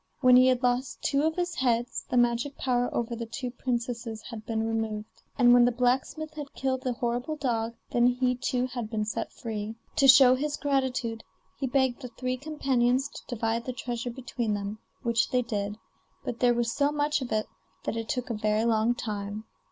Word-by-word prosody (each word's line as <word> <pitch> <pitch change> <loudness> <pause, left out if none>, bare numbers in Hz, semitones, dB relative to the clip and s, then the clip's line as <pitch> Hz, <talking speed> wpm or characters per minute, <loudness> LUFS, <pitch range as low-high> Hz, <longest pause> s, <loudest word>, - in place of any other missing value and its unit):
When 255 -2 +7
he 255 +1 +7
had 255 0 +2
lost 250 +1 0
two 275 - +2
of 320 - -1
his 355 -1 -1
heads 240 -3 0
the 250 - +1
magic 240 +3 +2
power 245 -1 +1
over 235 0 -2
the 230 0 -5
two 250 +2 -4
princesses 235 -3 -3
had 225 -2 -9
been 225 -1 0
removed, 220 -1 -3 0.2
and 245 -2 +6
when 245 0 +7
the 245 - +4
blacksmith 260 +6 0
had 295 -2 -8
killed 260 -1 -1
the 255 -1 -1
horrible 245 +4 -2
dog, 235 -5 -1 0.2
then 240 0 +4
he 250 0 +2
too 250 0 0
had 240 -3 -5
been 215 -2 -1
set 215 - -3
free. 220 -2 -5 0.2
To 275 -3 +5
show 265 -1 +9
his 290 +3 -1
gratitude 260 -5 -1 0.4
he 270 - -1
begged 260 0 +1
the 255 - -5
three 255 0 -1
companions 270 -3 +1
to - - -10
divide 230 -1 -1
the 255 - -3
treasure 240 0 -4
between 235 -3 -2
them, 205 +1 -4 0.2
which 235 -2 +2
they 250 -1 +2
did; 210 -3 -3 0.5
but 240 - -4
there 245 -1 +4
was 235 -1 0
so 285 +1 +2
much 295 0 0
of 250 - -5
it 215 0 +1 0.4
that - - -2
it 225 -1 -4
took 250 -4 -2
a - - 0
very 215 +1 +1
long 230 +1 +2
time. 210 -2 -4
245 Hz, 200 wpm, -28 LUFS, 230-260 Hz, 0.5 s, show